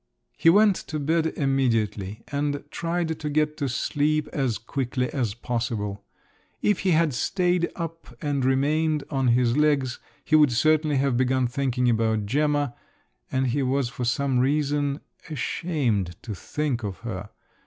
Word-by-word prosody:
He 165 Hz, -, +4 dB
went 205 Hz, +2 st, +6 dB
to 155 Hz, -, -3 dB
bed 160 Hz, +3 st, +1 dB
immediately, 115 Hz, -8 st, 0 dB
and 145 Hz, 0 st, -1 dB
tried 165 Hz, -1 st, -2 dB
to 150 Hz, -, -3 dB
get 150 Hz, +1 st, +1 dB
to 140 Hz, -, -1 dB
sleep 150 Hz, +4 st, 0 dB
as 130 Hz, -6 st, -1 dB
quickly 125 Hz, 0 st, -2 dB
as 115 Hz, -7 st, -1 dB
possible. 115 Hz, -4 st, -3 dB, 0.6 s
If 210 Hz, -3 st, +1 dB
he 190 Hz, -, 0 dB
had 165 Hz, -3 st, +3 dB
stayed 180 Hz, +6 st, +1 dB
up 165 Hz, -7 st, -7 dB
and 145 Hz, -3 st, -1 dB
remained 150 Hz, +3 st, +2 dB
on 135 Hz, -2 st, +1 dB
his 120 Hz, 0 st, +3 dB
legs, 145 Hz, -4 st, +2 dB, 0.3 s
he 155 Hz, -, +3 dB
would 150 Hz, -3 st, +6 dB
certainly 155 Hz, +2 st, +3 dB
have 135 Hz, -2 st, +1 dB
begun 130 Hz, 0 st, +2 dB
thinking 125 Hz, 0 st, 0 dB
about 110 Hz, -2 st, +1 dB
Gemma, 145 Hz, +2 st, +1 dB, 0.6 s
and 130 Hz, 0 st, +1 dB
he 140 Hz, +4 st, 0 dB
was 130 Hz, -1 st, +1 dB
for 125 Hz, -, -5 dB
some 130 Hz, +1 st, +1 dB
reason… 145 Hz, +1 st, +1 dB, 0.3 s
ashamed 125 Hz, -, -1 dB
to 110 Hz, -, -5 dB
think 135 Hz, +5 st, -2 dB
of 100 Hz, -1 st, -5 dB
her. 105 Hz, -4 st, -5 dB
140 Hz, 150 wpm, -25 LUFS, 120-150 Hz, 0.6 s, went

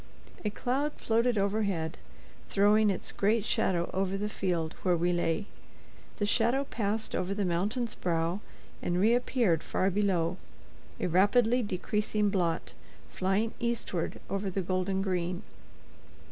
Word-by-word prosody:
A 210 Hz, -, +1 dB
cloud 270 Hz, +7 st, -1 dB
floated 230 Hz, +1 st, +1 dB
overhead, 195 Hz, -5 st, 0 dB, 0.5 s
throwing 210 Hz, +2 st, +4 dB
its 190 Hz, -, -2 dB
great 215 Hz, +1 st, +1 dB
shadow 180 Hz, -7 st, +1 dB
over 190 Hz, +1 st, 0 dB
the 210 Hz, +1 st, -2 dB
field 170 Hz, -6 st, -1 dB
where 180 Hz, -2 st, +2 dB
we 175 Hz, +1 st, +1 dB
lay. 175 Hz, +3 st, 0 dB, 0.7 s
The 205 Hz, -, 0 dB
shadow 235 Hz, +6 st, +2 dB
passed 220 Hz, -4 st, -2 dB
over 185 Hz, +2 st, -1 dB
the 205 Hz, -1 st, 0 dB
mountain's 205 Hz, +7 st, 0 dB
brow 170 Hz, +1 st, -1 dB, 0.4 s
and 175 Hz, 0 st, 0 dB
reappeared 230 Hz, -5 st, +3 dB
far 190 Hz, +1 st, 0 dB
below, 185 Hz, -4 st, +1 dB, 0.6 s
a -, -, -1 dB
rapidly 210 Hz, +7 st, +4 dB
decreasing 210 Hz, +1 st, 0 dB
blot, 175 Hz, -4 st, -1 dB, 0.4 s
flying 195 Hz, +4 st, 0 dB
eastward 235 Hz, -7 st, -2 dB
over 195 Hz, 0 st, -2 dB
the 190 Hz, 0 st, -2 dB
golden 185 Hz, +1 st, 0 dB
green. 180 Hz, -2 st, -1 dB
195 Hz, 130 wpm, -30 LUFS, 180-220 Hz, 0.7 s, throwing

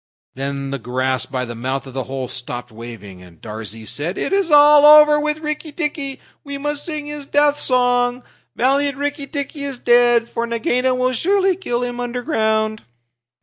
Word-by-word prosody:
Then 140 Hz, +1 st, -4 dB
the 140 Hz, -, -3 dB
grass 130 Hz, +2 st, -2 dB
by 130 Hz, -1 st, -3 dB
the 120 Hz, -, -7 dB
mouth 130 Hz, +4 st, -3 dB
of 135 Hz, -, -11 dB
the 130 Hz, -1 st, -3 dB
hole 130 Hz, -1 st, -4 dB
stopped 125 Hz, -1 st, -5 dB
waving, 110 Hz, -5 st, -10 dB
and 90 Hz, -2 st, -16 dB
Darzee 110 Hz, 0 st, -8 dB
said, 145 Hz, -, -4 dB
"It -, -, -2 dB
is 390 Hz, -3 st, +1 dB
all 295 Hz, 0 st, +7 dB
over 300 Hz, 0 st, +8 dB
with 300 Hz, +1 st, -2 dB
Rikki 300 Hz, 0 st, -4 dB
tikki! 290 Hz, -3 st, -4 dB, 0.2 s
We 280 Hz, -1 st, -6 dB
must 295 Hz, +1 st, -3 dB
sing 305 Hz, -3 st, -5 dB
his 295 Hz, -1 st, -7 dB
death 290 Hz, 0 st, +2 dB
song. 245 Hz, -1 st, +1 dB, 0.3 s
Valiant 280 Hz, +3 st, +1 dB
Rikki 285 Hz, 0 st, -3 dB
tikki 285 Hz, 0 st, -5 dB
is 275 Hz, -2 st, -5 dB
dead! 240 Hz, -1 st, +4 dB
For 235 Hz, 0 st, -3 dB
Nagaina 245 Hz, +2 st, 0 dB
will 255 Hz, 0 st, 0 dB
surely 385 Hz, -, +2 dB
kill 250 Hz, -10 st, -3 dB
him 245 Hz, 0 st, -4 dB
underground." 220 Hz, -4 st, -1 dB
245 Hz, 175 wpm, -19 LUFS, -, 0.3 s, over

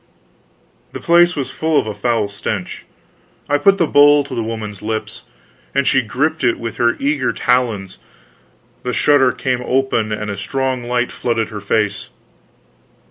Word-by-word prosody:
The -, -, -5 dB
place 175 Hz, +1 st, +4 dB
was 140 Hz, -3 st, -3 dB
full 160 Hz, -1 st, +1 dB
of -, -, -2 dB
a 110 Hz, -, -4 dB
foul 110 Hz, 0 st, 0 dB
stench. 100 Hz, -1 st, -5 dB, 0.6 s
I 145 Hz, 0 st, +1 dB
put 195 Hz, +6 st, +4 dB
the 170 Hz, -, +2 dB
bowl 145 Hz, -1 st, +5 dB
to 140 Hz, -, -9 dB
the 115 Hz, -, -2 dB
woman's 110 Hz, -3 st, -5 dB
lips, 110 Hz, +1 st, -5 dB, 0.5 s
and 140 Hz, -, +4 dB
as 140 Hz, -, -5 dB
she 135 Hz, -, +4 dB
gripped 145 Hz, +7 st, -2 dB
it 120 Hz, -2 st, +2 dB
with 115 Hz, -1 st, -6 dB
her 120 Hz, -1 st, +2 dB
eager 140 Hz, -2 st, 0 dB
talons 115 Hz, -7 st, -1 dB, 0.8 s
the 125 Hz, -, -3 dB
shutter 135 Hz, -2 st, +4 dB
came 125 Hz, 0 st, -2 dB
open 125 Hz, -4 st, 0 dB
and 105 Hz, -1 st, -3 dB
a 100 Hz, -, -5 dB
strong 130 Hz, +3 st, -2 dB
light 120 Hz, 0 st, -1 dB
flooded 115 Hz, -2 st, -2 dB
her 105 Hz, -2 st, -7 dB
face. 105 Hz, 0 st, -1 dB
125 Hz, 165 wpm, -18 LUFS, 110-140 Hz, 0.8 s, bowl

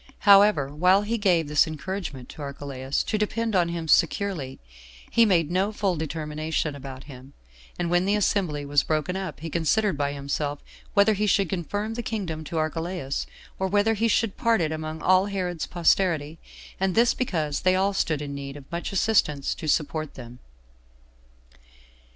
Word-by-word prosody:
However, 200 Hz, -8 st, +6 dB
while 180 Hz, +6 st, +4 dB
he 230 Hz, +2 st, -2 dB
gave 175 Hz, -6 st, +2 dB
this 150 Hz, +1 st, +3 dB
encouragement 155 Hz, -4 st, -5 dB
to -, -, -10 dB
Archelaus 140 Hz, -1 st, -3 dB
to 215 Hz, -, -2 dB
depend 220 Hz, +1 st, -1 dB
on 175 Hz, -2 st, +3 dB
him 170 Hz, -1 st, -4 dB
securely, 165 Hz, -5 st, +1 dB, 0.5 s
he 230 Hz, -1 st, +5 dB
made 170 Hz, -5 st, +2 dB
no 190 Hz, +4 st, +1 dB
full 200 Hz, -4 st, 0 dB
determination 155 Hz, 0 st, -3 dB
about 135 Hz, -1 st, -9 dB
him; 135 Hz, -1 st, -12 dB, 0.4 s
and 175 Hz, -1 st, -2 dB
when 175 Hz, +1 st, +3 dB
the 200 Hz, +1 st, +2 dB
assembly 180 Hz, -8 st, 0 dB
was 145 Hz, 0 st, +3 dB
broken 155 Hz, +5 st, -1 dB
up, 185 Hz, -7 st, -5 dB
he 165 Hz, -, -5 dB
considered 180 Hz, +4 st, +1 dB
by 140 Hz, 0 st, 0 dB
himself 145 Hz, +1 st, -3 dB, 0.4 s
whether 200 Hz, +2 st, +5 dB
he 210 Hz, +1 st, 0 dB
should 195 Hz, -3 st, +2 dB
confirm 205 Hz, +5 st, -3 dB
the 240 Hz, -, -3 dB
kingdom 190 Hz, -9 st, -4 dB
to 165 Hz, -, -4 dB
Archelaus, 160 Hz, -2 st, -2 dB, 0.3 s
or 190 Hz, -, 0 dB
whether 205 Hz, +3 st, +2 dB
he 225 Hz, +2 st, +1 dB
should 225 Hz, -2 st, +1 dB
part 230 Hz, -2 st, +2 dB
it 160 Hz, -2 st, 0 dB
among 155 Hz, 0 st, -5 dB
all 185 Hz, +1 st, +4 dB
Herod's 180 Hz, -4 st, -3 dB
posterity; 165 Hz, -3 st, +1 dB, 0.4 s
and 190 Hz, -1 st, 0 dB
this 235 Hz, +1 st, +4 dB
because 155 Hz, -, -2 dB
they 185 Hz, 0 st, +3 dB
all 195 Hz, +2 st, +1 dB
stood 155 Hz, -6 st, 0 dB
in 140 Hz, -1 st, -5 dB
need 140 Hz, 0 st, -6 dB
of 140 Hz, -, -12 dB
much 170 Hz, +1 st, -4 dB
assistance 195 Hz, -8 st, +1 dB
to 155 Hz, -, -7 dB
support 155 Hz, 0 st, -1 dB
them. 120 Hz, -1 st, -10 dB
170 Hz, 170 wpm, -25 LUFS, 150-200 Hz, 0.5 s, However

